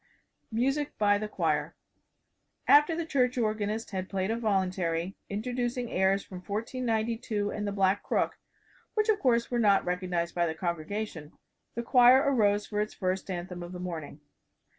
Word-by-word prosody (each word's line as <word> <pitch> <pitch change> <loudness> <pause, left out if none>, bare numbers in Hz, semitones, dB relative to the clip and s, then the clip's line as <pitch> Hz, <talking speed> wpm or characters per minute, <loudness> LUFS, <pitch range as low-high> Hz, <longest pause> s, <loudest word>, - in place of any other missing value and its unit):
MUSIC 270 +6 0
BY 205 -1 +3
THE 215 - -3
CHOIR - - -1 0.9
After 295 +3 +6
the 335 0 -2
church 255 -5 +1
organist 215 -1 -1
had 190 -1 -4
played 190 +1 -1
a - - +1
voluntary, 190 -5 -1
introducing 240 +3 -2
airs 190 +1 +2
from 185 - -9
"1492" 220 +1 -2
and 210 -1 -3
"The - - -1
Black 195 0 +2
Crook" - - -1 0.6
which, 430 0 +1
of 420 -1 +3
course, 235 -5 +2
were 240 - +1
not 200 -3 +4
recognized 180 -1 -1
by 175 -1 +1
the 160 - -3
congregation 170 -1 -4 0.4
the 235 - -2
choir 245 +1 +7
arose 210 -8 +2
for 210 -1 -2
its 210 - -4
first 185 +1 -2
anthem 180 0 -5
of 175 +1 -7
the 180 - -6
morning. 160 -4 -6
205 Hz, 160 wpm, -29 LUFS, 185-235 Hz, 0.9 s, choir